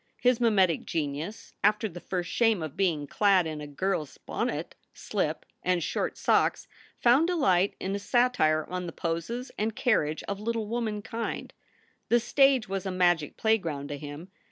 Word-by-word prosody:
His 250 -1 +3
mimetic 195 -8 +3
genius, 155 +6 -4
after 210 +2 +3
the 175 -3 -9
first 175 -2 -3
shame 220 +1 +2
of 155 -3 -6
being 165 -7 +1
clad 195 +3 +3
in 155 -1 -4
a 150 - -6
girl 180 +5 -1
s 145 -3 -12
bonnet, - - -3 0.2
slip, - - -2 0.2
and 180 -2 +1
short - - -2
socks, - - +2 0.3
found 255 +7 +4
delight 265 - +2
in 190 - -3
a 200 - -1
satire 200 -9 +2
on 180 -1 -4
the 165 - -6
poses 170 +10 -3
and 215 +1 -1
carriage 160 - +1
of 200 0 -4
little 225 +1 -2
womankind. 225 0 -3 0.6
The 240 - +5
stage 270 0 +3
was 195 0 -3
a - - -1
magic 175 -4 +1
playground 165 -11 0
to 145 - -4
him. 150 +5 -8
190 Hz, 165 wpm, -28 LUFS, 160-225 Hz, 0.6 s, The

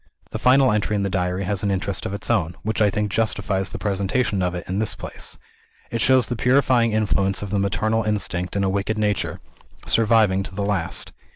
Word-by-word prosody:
The - - -4
final 130 0 +5
entry 105 0 0
in 100 - 0
the 100 - -2
Diary 90 0 -1
has 100 0 -1
an 100 - 0
interest 95 0 -2
of - - -5
its 100 - -3
own, 85 0 0
which 110 +1 -1
I 105 - +5
think 105 +1 -2
justifies 100 -3 0
the - - -6
presentation 100 +1 0
of 90 -1 -1
it 90 - -6
in 95 +2 -2
this 110 - 0
place. - - -7 0.5
It 115 - -2
shows 130 -1 +4
the 120 - -3
purifying 125 -1 +3
influence 100 -2 +1
of 100 - -6
the 100 - +1
maternal 105 +3 0
instinct 100 -4 -1
in 100 - +1
a - - +1
wicked 100 +3 -1
nature, 105 -2 -1 0.4
surviving 110 -4 +3
to 95 -1 -8
the 100 - -2
last. 95 -4 -1
100 Hz, 210 wpm, -22 LUFS, 95-110 Hz, 0.5 s, final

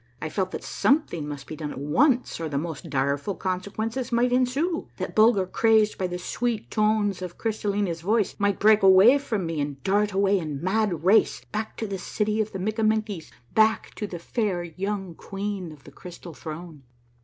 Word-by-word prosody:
I 155 - -4
felt 185 +2 -1
that - - -6
something 220 - +1
must 145 -2 -6
be 155 - -7
done 150 -1 -5
at - - -7
once, 245 - +2
or 165 -1 -3
the 140 - -2
most 160 +1 -5
direful 140 +6 -1
consequences 220 +7 -3
might 240 +1 +2
ensue 270 +7 0
— - - -35
that - - -4
Bulger, 215 -3 +5
crazed 220 +2 +2
by 185 - 0
the 180 0 -4
sweet 225 +5 -3
tones 210 -3 +1
of 180 -2 -6
Crystallina's 205 -6 -1
voice, 210 +3 +1
might 200 -1 +1
break 215 +1 +5
away 195 +8 +7
from 220 -9 -2
me 165 -2 -2
and 145 -1 -5
dart 205 +2 +2
away 195 0 +2
in 150 -5 -4
mad 185 -2 0
race 195 +5 +3
back 215 +1 -4
to 225 - -3
the 195 -2 -4
city 210 +3 -1
of 215 - -3
the - - -5
Mikkamenkies, 215 -2 -1 0.2
back 220 0 +3
to 210 - -4
the 180 - -6
fair 185 0 -2
young 190 +2 -4
queen 195 -1 -5
of 150 -2 -14
the 145 - -13
Crystal 175 +1 -10
Throne. 160 0 -8
195 Hz, 190 wpm, -25 LUFS, 170-220 Hz, 0.2 s, away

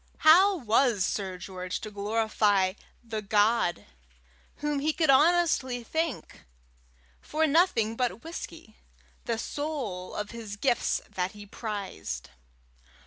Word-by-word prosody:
How 375 +5 +7
was 230 - +2
Sir 190 -3 -3
George 185 0 -5
to 215 - -7
glorify 205 -2 +1 0.3
the 225 -2 -4
God 210 -2 +2 0.7
whom 295 -1 -2
he 305 +2 +1
could 315 -4 +3
honestly 280 -5 +3
thank 320 +3 -3 0.8
for 315 +1 0
nothing 280 - +3
but 245 -1 -2
whisky, 330 +1 -8 0.5
the 235 -3 -1
sole 255 -10 -4
of 210 0 -4
his 225 -3 -7
gifts 240 +3 +1
that 180 0 -3
he 205 0 -11
prized? 195 - -6
225 Hz, 115 wpm, -28 LUFS, 205-295 Hz, 0.8 s, How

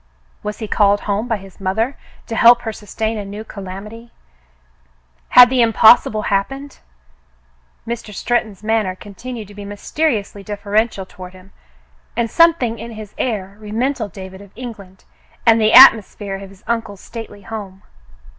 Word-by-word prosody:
Was 210 0 -5
he 220 - -5
called 205 -1 +2
home 205 +3 -2
by 225 - 0
his 195 -1 -15
mother 220 +8 -1 0.3
to 230 - -5
help 240 +1 +6
her 225 -2 -4
sustain 220 +1 -4
a - - -4
new 205 +2 -7
calamity 210 +3 -9
^ - - -25 1.2
Had 250 0 +8
the 255 -2 +3
impossible 225 -1 +5
happened.? 270 +9 -2 1.1
Mr. 230 -2 -5
Stretton's 215 -1 -2
manner 215 -4 0
continued 215 +3 -9
to - - -13
be 205 0 -9
mysteriously 205 +1 -2
deferential 205 0 -1
toward 185 -1 -11
him, 185 +1 -17 0.7
and 235 -1 0
something 320 -10 +3
in 230 +1 -8
his 215 -2 -10
air 200 -5 -3
reminded 220 +1 -2
David 190 +1 -10
of 200 - -14
England 205 -6 -10 0.4
and 225 -1 +5
the 215 0 +3
atmosphere 215 -5 +7
of 195 0 -10
his 195 -1 -19
uncle's 225 -4 -3
stately 220 -3 -10
home. 200 -3 -8
215 Hz, 150 wpm, -18 LUFS, 200-230 Hz, 1.2 s, Had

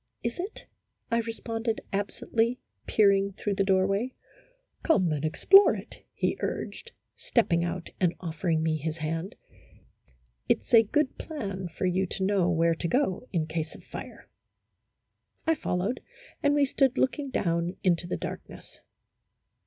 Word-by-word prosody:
" - - -45
Is 235 +7 -3
it? 390 +5 -5 0.2
" - - -45
I 230 - +3
responded, 225 0 -3
absently, 225 +4 0 0.3
peering 200 -2 +3
through 205 +1 -2
the 195 - +1
doorway. 195 +5 +1 0.3
" - - -40
Come 185 - +3
and 150 -1 -2
explore 390 - +6
it," - - -10
he - - -1
urged, 470 - -4 0.2
stepping 170 -8 +1
out 170 0 -4
and 180 -2 +2
offering 165 -1 -1
me 160 -1 +1
his 155 +1 -3
hand. 165 +4 -3 0.6
" 60 -1 -38
It - - +3
's - - -16
a 230 - +10
good 275 +6 0
plan 200 - -4
for 170 +2 -4
you 185 +1 +1
to 190 - -3
know 190 -2 +2
where 165 -1 +3
to 165 +1 -3
go 250 - 0
in 165 -4 0
case 160 0 -4
of - - -13
fire." - - -9 1.2
I 325 - +4
followed, 205 - -1 0.4
and 285 -1 +3
we 290 -1 +4
stood 270 -1 +2
looking 275 +2 0
down 170 -6 0
into 175 -2 +2
the - - -2
darkness. - - -8
195 Hz, 160 wpm, -28 LUFS, 170-235 Hz, 1.2 s, a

